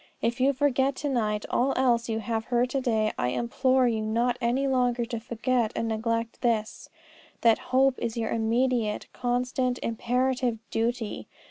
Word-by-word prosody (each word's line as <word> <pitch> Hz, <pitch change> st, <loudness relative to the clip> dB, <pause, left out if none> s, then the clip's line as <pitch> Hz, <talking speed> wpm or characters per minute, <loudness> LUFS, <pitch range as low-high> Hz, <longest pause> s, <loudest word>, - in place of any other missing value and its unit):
If 235 Hz, +2 st, -1 dB
you 270 Hz, +2 st, +5 dB
forget 270 Hz, 0 st, +1 dB
to 290 Hz, -, -3 dB
night 215 Hz, -5 st, 0 dB
all 265 Hz, +3 st, +1 dB
else 240 Hz, -2 st, +2 dB
you 225 Hz, 0 st, -1 dB
have 225 Hz, 0 st, -2 dB
heard 245 Hz, +1 st, +1 dB
to 270 Hz, -, 0 dB
day, 220 Hz, -4 st, +1 dB
I -, -, +1 dB
implore 255 Hz, -, +2 dB
you 225 Hz, -2 st, 0 dB
not 235 Hz, +3 st, +1 dB
any 245 Hz, +4 st, +1 dB
longer 250 Hz, -2 st, +1 dB
to 230 Hz, -1 st, -4 dB
forget 235 Hz, 0 st, -1 dB
and 230 Hz, -, -1 dB
neglect 230 Hz, +1 st, -2 dB
this, 225 Hz, -3 st, -1 dB, 0.5 s
that 230 Hz, -2 st, +4 dB
hope 265 Hz, 0 st, +3 dB
is 230 Hz, 0 st, -3 dB
your 225 Hz, -1 st, -1 dB
immediate, 230 Hz, -1 st, 0 dB
constant, 250 Hz, 0 st, -1 dB
imperative 250 Hz, +1 st, 0 dB
duty. 230 Hz, -1 st, -2 dB
240 Hz, 160 wpm, -27 LUFS, 225-255 Hz, 0.5 s, you